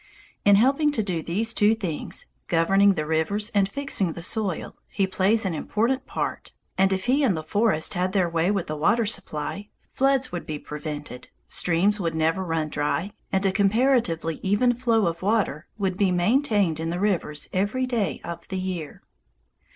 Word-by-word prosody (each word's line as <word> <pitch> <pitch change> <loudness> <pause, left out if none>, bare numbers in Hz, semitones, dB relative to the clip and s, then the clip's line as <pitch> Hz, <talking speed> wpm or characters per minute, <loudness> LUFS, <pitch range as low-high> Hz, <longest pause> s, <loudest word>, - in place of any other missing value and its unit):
In 205 0 +6
helping 275 +8 +3
to 220 - 0
do 180 -5 -2
these 215 +8 0
two 210 +1 +4
things, 180 -9 -3 0.2
governing 195 +4 +4
the 155 - -2
rivers 160 +8 0
and 200 -2 +2
fixing 200 - -1
the 170 - -8
soil, 195 -3 -2
he 195 - 0
plays 195 +3 +2
an 185 - -1
important 235 - -1
part, - - -4 0.2
and 195 0 +3
if 190 0 -1
he 265 +4 +3
and 205 -11 +2
the 155 - -4
forest 200 -1 +1
had 180 +1 0
their 190 -3 +2
way 165 +1 0
with 200 -4 0
the 155 - -4
water 225 +10 +2
supply, 195 -1 -3 0.2
floods 270 -1 +1
would 175 - -5
be 155 - -3
prevented, 150 -3 -7 0.2
streams 185 +5 +2
would 165 -3 -2
never 160 +4 +1
run 165 -3 -1
dry, 155 +7 -1 0.2
and 190 +1 +1
a 195 - +3
comparatively 200 - +1
even 205 +6 +2
flow 230 -3 +1
of 170 0 -2
water 195 -6 0
would 190 -3 -1
be 195 -2 +2
maintained 200 - +2
in 165 0 -2
the 175 +1 -2
rivers 175 -7 -1
every 205 +7 0
day 235 -6 -1
of 170 0 -7
the 190 - -4
year. 185 -5 -5
190 Hz, 180 wpm, -25 LUFS, 165-220 Hz, 0.2 s, In